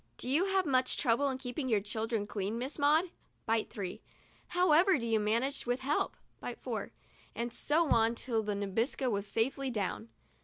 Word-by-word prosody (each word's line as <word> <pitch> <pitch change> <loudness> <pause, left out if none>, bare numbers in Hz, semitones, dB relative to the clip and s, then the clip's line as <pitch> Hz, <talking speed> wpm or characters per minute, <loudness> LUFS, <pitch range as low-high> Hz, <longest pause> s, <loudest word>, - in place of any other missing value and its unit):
"Do - - -6
you 300 +8 +3
have 385 -1 +2
much 255 -3 +2
trouble 265 +2 +2
in 260 - -2
keeping 260 +1 -4
your 220 -3 +3
children 220 +1 -2
clean, 205 +1 -3
Miss 260 +6 -4
Maud 310 +5 +3 0.2
?" - - -41
(bite 225 -1 +1
three). 190 -4 -5 0.2
" - - -31
How 360 -2 +4
ever 350 +3 +6
do 235 - -4
you 225 -1 +2
manage 235 +6 0
with 245 +2 0
help 285 +3 0
?" - - -40
(bite - - -5
four) - - -4 0.2
— - - -28
and 235 0 -3
so 310 +6 +1
on 230 +1 +4
till 230 -2 0
the 210 -1 -2
Nabisco 225 +6 -1
was 200 -1 -2
safely 265 +5 0
down. 220 0 -3
245 Hz, 205 wpm, -32 LUFS, 220-285 Hz, 0.2 s, ever